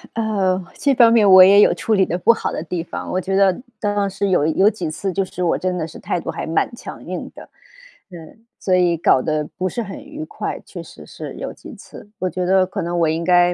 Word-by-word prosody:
呃， 195 -5 0 0.2
这 280 - +2
方 235 -2 +6
面 215 -4 +5
我 185 -1 +10
也 200 +2 +7
有 - - +5
处 225 - -2
理 195 -2 +3
得 175 - -3
不 205 +6 +4
好 225 - -4
的 - - -4
地 170 0 -4
方， - - -7
我 185 - -1
觉 190 +1 -2
得 195 0 +2 0.2
当 205 -1 -1
时 195 +1 -2
有 180 -5 +2
有 190 +6 +3
几 185 -7 -5
次 190 +5 -4
就 195 - 0
是 180 -1 -6
我 170 - +1
真 185 -1 -2
的 165 -2 -3
是 160 - -12
态 - - -2
度 165 - -5
还 165 - -5
蛮 165 +7 0
强 - - -10
硬 - - -6
的， - - -12 0.6
嗯， 175 +5 -13 0.2
所 185 - +1
以 175 -2 +2
搞 145 -5 +3
得 155 +1 -1
不 185 +1 -1
是 235 +5 -4
很 200 +7 -9
愉 300 +2 -8
快， - - -5
确 - - -9
实 - - -13
是 - - -9
有 - - -6
几 - - -12
次。 205 - -14
我 185 - -1
觉 180 0 -3
得 190 +1 +3
可 190 - -5
能 175 +1 -3
我 165 - +3
应 160 +2 -2
该， 175 0 +4
185 Hz, 270 characters per minute, -20 LUFS, 175-205 Hz, 0.6 s, 我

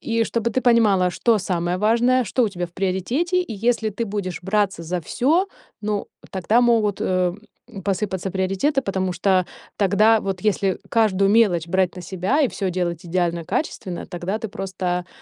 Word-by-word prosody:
И 230 0 0
чтобы 235 0 -1
ты 260 - 0
понимала, 210 -7 +4
что 230 +4 +2
самое 180 -2 -1
важное, 235 +4 +3
что 250 +5 0
у 225 - +2
тебя 180 -2 -4
в 170 - -23
приоритете, 235 - 0
и 355 - -7
если 225 +1 +1
ты 220 +3 -3
будешь 195 -5 -4
браться 195 -2 0
за 175 +2 -3
всё, 300 - +1 0.3
ну 210 -1 -2 0.2
тогда 205 +6 +2
могут, 225 -4 +2
э, 180 -1 +1 0.5
посыпаться 190 -1 -2
приоритеты, 195 - 0
потому 190 -3 -1
что 185 0 +2 0.3
тогда 215 +3 +4
вот 190 -2 -4
если 195 -3 +1
каждую 200 -4 +3
мелочь 200 -7 +3
брать 185 +1 0
на 180 - -7
себя, 190 - 0
и 270 - +3
всё 195 -2 -3
делать 175 -1 -3
идеально 170 -1 -1
качественно, 195 - -3
тогда 185 +3 -3
ты 220 - -5
просто, 180 -2 -3
195 Hz, 170 wpm, -22 LUFS, 180-225 Hz, 0.5 s, понимала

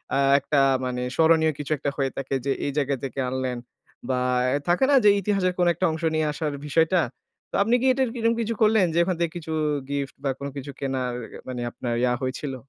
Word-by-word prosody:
আ - - +2 0.2
একটা 140 +1 +1 0.2
মানে 125 0 -3
স্মরণীয় 160 -1 +4
কিছু 145 - -5
একটা 140 +1 -2
হয়ে 135 -2 0
থাকে 135 0 -2
যে, 140 - +1
এই 145 - -1
জায়গা 140 -1 +1
থেকে 135 0 -4
আনলেন 130 -1 -2 0.5
বা 130 - +1 0.4
এ - - +2
থাকে 180 +9 +4
না? 280 - +6
যে, 205 - +7
ইতিহাসের 195 -2 +1
কোনো 175 -1 +3
একটা 180 +3 -1
অংশ 160 +1 -5
নিয়ে 155 - +1
আসার 150 -1 -3
বিষয়টা? 165 +4 +3 0.5
তো - - -4
আপনি 230 +4 +2
কি - - 0
এটার 260 -2 0
কি, 250 - -7
এরম 230 0 +3
কিছু 230 +1 -1
করলেন 215 -3 +5
যে, 170 - +2
ওখান 185 +1 -1
থেকে 170 -1 0
কিছু 160 -1 -7 0.4
গিফট 140 -1 -3
বা 135 - 0
কোনো 140 0 -4
কিছু 140 +1 -6
কেনার 130 -2 -2 0.3
মানে 125 -1 -4
আপনার 120 0 -4
ইয়া 125 -1 +3
হয়েছিল? 130 +1 -3
150 Hz, 220 wpm, -25 LUFS, 135-180 Hz, 0.5 s, যে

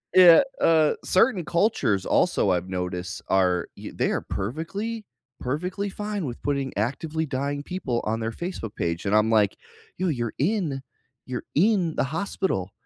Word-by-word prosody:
Yeah, 180 +1 +9 0.2
uh, 160 -2 +5
certain 185 -2 +3
cultures 170 - +1
also 95 - +2
I've 90 +1 -1
noticed 90 -1 -4
are, 90 -2 +2
y - - -8
they - - 0
are - - 0
perfectly, 195 - -4 0.3
perfectly 180 +10 -2
fine 205 -3 -4
with 120 -2 -6
putting 140 -2 -1
actively 155 +8 -1
dying 140 +1 -2
people 145 -8 -2
on 110 +1 -1
their 115 0 -2
Facebook 170 - -5
page, 85 +1 -2
and 100 +2 +2
I'm, 110 +1 +4
like, 105 -3 +3 0.4
yo, 185 +1 0
you're 120 -7 -1
in 160 -5 0 0.5
you're 125 - -3
in 180 -2 +3
the - - +2
hospital, 155 - -2
140 Hz, 155 wpm, -25 LUFS, 110-180 Hz, 0.5 s, Yeah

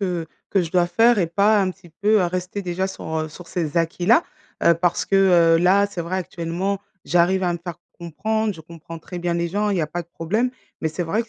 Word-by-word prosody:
que 175 -4 -2 0.2
que 195 - +2
je 165 - -5
dois 175 0 +3
faire 225 +6 +4
et 175 - +2
pas 200 +6 +3
un 190 -1 +1
petit 185 -2 -15
peu, 210 +6 +2
heu, - - +2
rester 185 +3 -3
déjà 180 +1 -2
sur, 190 - -8 0.2
heu, - - -7
sur 170 +3 -12
ces 160 -4 -3
acquis-là, 175 - +3 0.4
heu, - - +6
parce 175 +1 0
que 195 - +1 0.4
heu, - - +1
là, 190 +4 +4
c'est 200 -3 -6
vrai 170 +3 -3
actuellement, 180 +2 -3 0.3
j'arrive 180 +2 +2
à 175 -1 +1
me 170 - -4
faire 175 -3 -7 0.2
comprendre. 215 +6 -2
Je 160 - -11
comprends 165 +1 -10
très 175 +2 -8
bien 175 0 -1
les 170 0 -1
gens. 205 +4 0
Il 200 - 0
y 175 - +1
a - - -1
pas 175 +3 -4
de 170 - -25
problème, 210 +10 -1 0.3
mais 160 - 0
c'est 160 +3 -3
vrai 195 +7 0
que 230 - -18
180 Hz, 250 wpm, -22 LUFS, 170-200 Hz, 0.4 s, heu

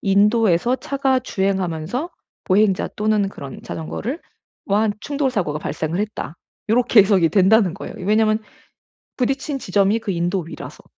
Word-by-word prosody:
"인도에서 210 +2 +3
차가 270 -1 0
주행하면서 190 - -2 0.3
보행자 195 0 +2
또는 210 -2 +1
그런 140 -8 -9
자전거를 230 - -5 0.5
와 210 +2 +2
충돌사고가 255 - -1
발생을 155 +4 -3
했다." 210 -5 -4 0.3
요렇게 240 -1 +5
해석이 190 -4 +4
된다는 195 0 +4
거예요, 200 - -7
왜냐하면 215 +3 +2 0.8
부딪힌 270 +2 -1
지점이 200 0 +2
그 210 -3 -3
인도 175 +2 0
위라서. 165 - -10
205 Hz, 335 characters per minute, -21 LUFS, 185-235 Hz, 0.8 s, 요렇게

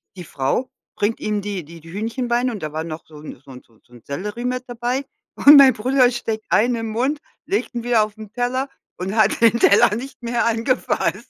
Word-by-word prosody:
die 180 - -8
Frau 150 - -2 0.3
bringt 210 +2 -1
ihm 210 -1 -1
die 200 -3 -4
die 165 +2 -12
die 165 +1 -13
Hühnchenbeine 240 +3 -1
und 210 -4 -7
da 150 -1 -5
war 160 +1 -3
noch 160 -1 -7
so 155 - -17
'n 150 - -10
so 135 - -14
'n 125 -1 -11
so 115 -2 -28
'n 120 - -15
Sellerie 205 +11 -5
mit 250 0 -2
dabei 245 +3 -3 0.3
und 290 +1 +8
mein 275 -2 +8
Bruder 250 +2 +2
steckt 225 -2 -4
einen 240 +3 +3
im 225 -1 -4
Mund, 260 +7 -1 0.3
legt 400 - -2
ihn 235 - -3
wieder 235 -3 +3
auf 210 -1 -6
den 215 -1 -12
Teller 255 +3 -1 0.3
und 190 +3 -4
hat 215 -2 +3
den 230 0 +4
Teller 210 +1 +5
nicht 265 +5 -8
mehr 235 0 -1
angefasst. 230 +3 -1
225 Hz, 220 wpm, -21 LUFS, 200-245 Hz, 0.3 s, und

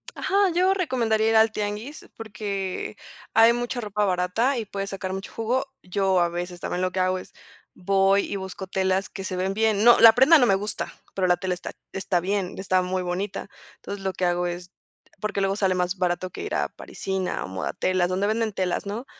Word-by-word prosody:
Ajá, 395 0 +2
yo 370 +2 +4
recomendaría 230 - +1
ir 225 - +2
al 220 0 +5
tianguis, 210 +7 -5
porque 200 -4 -4 0.4
hay 225 +1 +7
mucha 240 +1 -3
ropa 210 -1 -1
barata 190 +8 +1
y 230 - -3
puedes 195 -1 -5
sacar 190 -1 -4
mucho 195 +1 -6
jugo. 235 +4 -1 0.2
Yo, 190 0 +1
a 175 -1 +2
veces, 175 +1 -5
también 180 - -3
lo 185 0 0
que 185 - -3
hago 185 0 +1
es - - -13 0.4
voy 195 +1 +3
y - - -2
busco 190 0 -6
telas 190 0 0
que 195 - -7
se 185 - -4
ven 185 +1 -1
bien, 215 -1 +2
no, 240 +1 +7
la 225 -1 +10
prenda 270 +7 +7
no 245 - +4
me 195 - +4
gusta, 205 +2 -4 0.2
pero 185 -1 0
la 180 0 +3
tela 185 -2 -2
está 180 - -6 0.2
está 190 -2 0
bien, 190 +1 -2
está 185 -1 +1
muy 185 0 -2
bonita. 185 +4 -3 0.3
Entonces, 200 -1 -8
lo 190 -1 -1
que 185 - -1
hago 175 0 +1
es 175 +1 -6 0.5
porque 210 -1 -1
luego 195 0 +1
sale 190 -3 +1
más 180 +1 -1
barato 180 0 -1
que - - -7
ir - - -3
a - - 0
Parisina 190 -1 -4
o - - -6
Modatelas, 175 - -1
donde 190 +2 0
venden 220 0 0
telas 185 -1 -1
¿no? 215 +6 -5
195 Hz, 210 wpm, -25 LUFS, 185-220 Hz, 0.5 s, la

